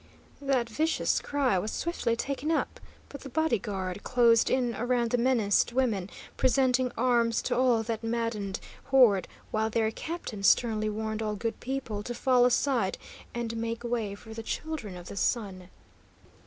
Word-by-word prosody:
That 270 -4 +1
vicious 310 +8 +1
cry 270 -9 +1
was 210 - -3
swiftly 290 -9 -1
taken 275 +5 -3
up, 325 - -1 0.3
but 280 - -9
the 275 - -8
body 300 -5 +1
guard 190 -1 -4
closed 235 -2 +4
in 250 -2 +1
around 240 -1 0
the 245 - +3
menaced 235 -3 +2
women, 225 -8 0 0.3
presenting 255 -1 +2
arms 235 -1 +2
to 245 - 0
all 245 -3 +3
that 225 0 -4
maddened 225 -4 -2 0.3
horde, 245 -9 +5 0.2
while 220 0 0
their 220 0 +1
captain 315 -7 -6
sternly 215 +1 +3
warned 220 +1 -3
all 215 -1 -1
good 230 +2 -3
people 250 -5 -4
to 240 +3 -5
fall 250 0 +4
aside 245 -5 +1 0.4
and 235 -1 -3
make 230 +1 -3
way 230 -4 -2
for 220 +2 -11
the 225 - -6
Children 225 - -5
of 175 - -10
the 200 - -8
Sun. 190 -5 -1
235 Hz, 160 wpm, -28 LUFS, 215-255 Hz, 0.4 s, horde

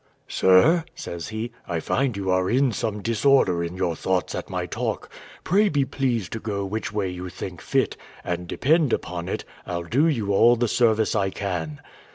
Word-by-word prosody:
"Sir," 125 - +5
says 85 -1 -6
he, 110 +2 -4 0.2
"I 85 -2 -1
find 125 +5 0
you 95 -1 -1
are 95 0 +2
in 130 +1 +3
some 105 -2 -3
disorder 115 -6 +3
in 85 +1 -4
your 90 -3 0
thoughts 90 0 -1
at - - -5
my - - -2
talk: - - -3 0.3
pray 205 +4 +3
be 145 -2 +1
pleased 125 -7 -1
to 115 - -3
go 100 -3 -3
which 110 +3 -3
way 105 -2 -1
you 90 0 -5
think - - -7
fit, - - 0 0.3
and 90 0 -3
depend 150 - +2
upon 85 0 -3
it, - - -3 0.2
I'll 85 -1 -4
do 135 - +2
you 110 -10 0
all 120 +4 +6
the 120 0 +1
service 110 -1 +2
I 100 -3 +1
can." 90 -7 -4
105 Hz, 190 wpm, -24 LUFS, 90-120 Hz, 0.3 s, all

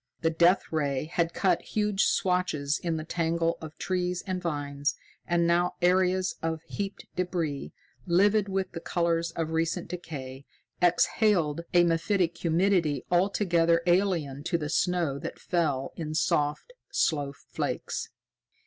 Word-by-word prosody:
The 165 - +2
Death 175 +3 +4
Ray 145 -3 0
had 165 +1 0
cut 185 -4 +2
huge 210 -2 0
swathes 175 -6 +1
in 165 -2 -2
the 155 - -4
tangle 165 0 0
of 155 -1 -9
trees 180 -1 -1
and 185 -2 -3
vines, 145 -3 -2 0.3
and 170 0 +2
now 175 +1 +2
areas 185 +1 +2
of 160 -1 -2
heaped 200 +3 -5
débris, 170 -6 -2 0.4
livid 200 +4 +3
with 190 0 -1
the 165 - -5
colors 170 -1 0
of 160 -1 -2
recent 165 +2 -1
decay, 140 -6 -7 0.3
exhaled 175 -2 +3
a 175 - +7
mephitic 170 +1 +1
humidity 165 -4 +1
altogether 175 -3 +3
alien 175 -7 +1
to 175 - +1
the 150 -2 -4
snow 170 -4 +1
that - - -6
fell 150 -7 -1
in 155 -2 -4
soft, 150 - 0 0.2
slow 145 -4 +1
flakes. 140 - -4
170 Hz, 135 wpm, -28 LUFS, 155-180 Hz, 0.4 s, a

